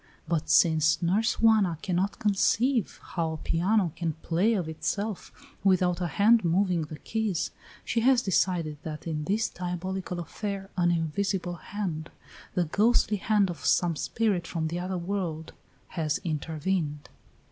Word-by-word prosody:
But 160 Hz, -2 st, -1 dB
since 155 Hz, -1 st, +4 dB
Nurse 205 Hz, +6 st, +2 dB
Juana 215 Hz, -7 st, +4 dB
cannot 185 Hz, +1 st, 0 dB
conceive 220 Hz, +3 st, +1 dB
how 165 Hz, -3 st, -2 dB
a -, -, -5 dB
piano 180 Hz, +4 st, +1 dB
can 165 Hz, -2 st, -2 dB
play 195 Hz, +8 st, +2 dB
of 180 Hz, -5 st, -1 dB
itself, 200 Hz, +6 st, -3 dB, 0.3 s
without 180 Hz, -2 st, +3 dB
a 175 Hz, -, 0 dB
hand 215 Hz, +7 st, +4 dB
moving 175 Hz, -1 st, +1 dB
the 150 Hz, 0 st, -9 dB
keys, 210 Hz, +2 st, -2 dB, 0.3 s
she 230 Hz, -, 0 dB
has 250 Hz, +1 st, +4 dB
decided 170 Hz, -5 st, 0 dB
that 155 Hz, -1 st, -7 dB
in 155 Hz, -2 st, -3 dB
this 210 Hz, +6 st, +1 dB
diabolical 180 Hz, +1 st, -4 dB
affair 195 Hz, +3 st, -5 dB
an 175 Hz, -1 st, +2 dB
invisible 175 Hz, +2 st, -1 dB
hand, 175 Hz, -7 st, -4 dB, 0.5 s
the 180 Hz, -, +2 dB
ghostly 210 Hz, +4 st, +2 dB
hand 200 Hz, -2 st, +2 dB
of 165 Hz, -, -10 dB
some 175 Hz, -2 st, +2 dB
spirit 200 Hz, 0 st, 0 dB
from 160 Hz, -2 st, -2 dB
the 170 Hz, +2 st, -3 dB
other 185 Hz, +1 st, -3 dB
world, 170 Hz, -3 st, -3 dB, 0.4 s
has 155 Hz, -2 st, -1 dB
intervened. 155 Hz, -1 st, -2 dB
180 Hz, 145 wpm, -28 LUFS, 165-200 Hz, 0.5 s, since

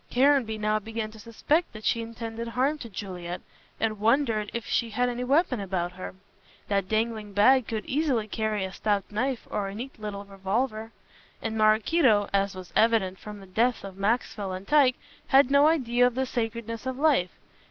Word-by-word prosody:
Caranby 255 Hz, -4 st, +3 dB
now 215 Hz, 0 st, +1 dB
began 220 Hz, 0 st, -5 dB
to 220 Hz, -, -13 dB
suspect 265 Hz, +9 st, 0 dB
that 215 Hz, 0 st, -10 dB
she 230 Hz, -, +2 dB
intended 230 Hz, 0 st, -6 dB
harm 265 Hz, +6 st, 0 dB
to 235 Hz, -, -8 dB
Juliet, 180 Hz, -3 st, -6 dB, 0.4 s
and 215 Hz, -2 st, -1 dB
wondered 225 Hz, -2 st, +2 dB
if 235 Hz, -, -4 dB
she 235 Hz, -, 0 dB
had 245 Hz, +3 st, 0 dB
any 245 Hz, 0 st, -3 dB
weapon 275 Hz, -, +2 dB
about 185 Hz, -3 st, -2 dB
her. 185 Hz, +1 st, -8 dB, 0.5 s
That 200 Hz, -2 st, +1 dB
dangling 220 Hz, -2 st, -1 dB
bag 250 Hz, +5 st, +5 dB
could 220 Hz, -2 st, -3 dB
easily 265 Hz, -7 st, 0 dB
carry 215 Hz, -2 st, -1 dB
a 190 Hz, -, -7 dB
stout 205 Hz, -2 st, -1 dB
knife 245 Hz, +4 st, -2 dB
or 200 Hz, -1 st, -1 dB
a 195 Hz, -, -6 dB
neat 245 Hz, +2 st, -7 dB
little 205 Hz, -1 st, -6 dB
revolver. 215 Hz, +4 st, -2 dB, 0.5 s
And 225 Hz, -1 st, -3 dB
Maraquito, 215 Hz, +1 st, +3 dB
as 200 Hz, 0 st, +1 dB
was 185 Hz, -2 st, -10 dB
evident 215 Hz, -4 st, +2 dB
from 210 Hz, -1 st, -9 dB
the -, -, -11 dB
deaths 225 Hz, +6 st, 0 dB
of 195 Hz, -1 st, -8 dB
Maxwell 200 Hz, -1 st, -1 dB
and 185 Hz, +1 st, -7 dB
Tyke, 280 Hz, -4 st, +5 dB, 0.3 s
had 270 Hz, 0 st, +5 dB
no 280 Hz, +1 st, +6 dB
idea 245 Hz, -6 st, +3 dB
of 245 Hz, -, -3 dB
the 265 Hz, +1 st, 0 dB
sacredness 230 Hz, -1 st, -4 dB
of 260 Hz, -1 st, -3 dB
life. 280 Hz, -, +3 dB
225 Hz, 185 wpm, -27 LUFS, 205-250 Hz, 0.5 s, no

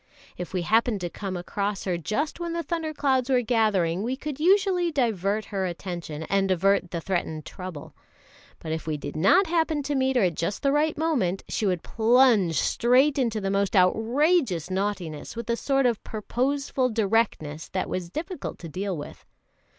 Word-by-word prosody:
If 180 Hz, -, -6 dB
we 185 Hz, -2 st, -1 dB
happened 220 Hz, +2 st, +2 dB
to 175 Hz, -1 st, -3 dB
come 195 Hz, -3 st, -5 dB
across 200 Hz, +3 st, -3 dB
her 185 Hz, -2 st, -1 dB
just 215 Hz, -, -2 dB
when 340 Hz, -1 st, -3 dB
the 335 Hz, 0 st, -2 dB
thunder 325 Hz, -2 st, -2 dB
clouds 270 Hz, -4 st, +1 dB
were 250 Hz, -2 st, +3 dB
gathering, 205 Hz, -7 st, +1 dB
we 245 Hz, +5 st, -1 dB
could 285 Hz, 0 st, -6 dB
usually 365 Hz, 0 st, +3 dB
divert 215 Hz, -, 0 dB
her 190 Hz, -1 st, 0 dB
attention 170 Hz, -3 st, -6 dB
and 195 Hz, +3 st, +1 dB
avert 190 Hz, 0 st, +2 dB
the 170 Hz, -, -3 dB
threatened 160 Hz, -3 st, -3 dB
trouble; 180 Hz, -6 st, -8 dB, 0.6 s
but 160 Hz, -, -7 dB
if 160 Hz, 0 st, -4 dB
we 155 Hz, -1 st, -1 dB
did 145 Hz, +1 st, -7 dB
not 195 Hz, -, +5 dB
happen 320 Hz, -3 st, 0 dB
to 290 Hz, -, -2 dB
meet 265 Hz, -1 st, +1 dB
her 195 Hz, -8 st, +3 dB
just 170 Hz, +5 st, -3 dB
at -, -, -40 dB
the 275 Hz, -, +3 dB
right 300 Hz, +2 st, +1 dB
moment, 250 Hz, -, 0 dB
she 215 Hz, -, -1 dB
would 180 Hz, -3 st, -1 dB
plunge 225 Hz, -, +4 dB
straight 265 Hz, +5 st, +3 dB
into 230 Hz, -4 st, 0 dB
the 195 Hz, -1 st, -2 dB
most 200 Hz, +1 st, 0 dB
outrageous 225 Hz, -, +2 dB
naughtiness 185 Hz, -5 st, -3 dB
with 235 Hz, 0 st, -3 dB
a -, -, +2 dB
sort 275 Hz, +2 st, +1 dB
of 235 Hz, -4 st, +1 dB
purposeful 255 Hz, +4 st, -1 dB
directness 210 Hz, -9 st, 0 dB
that 185 Hz, -1 st, -2 dB
was 180 Hz, -2 st, -4 dB
difficult 335 Hz, -, -5 dB
to 170 Hz, -, -9 dB
deal 185 Hz, +3 st, -3 dB
with. 145 Hz, -, -9 dB
215 Hz, 180 wpm, -26 LUFS, 180-270 Hz, 0.6 s, not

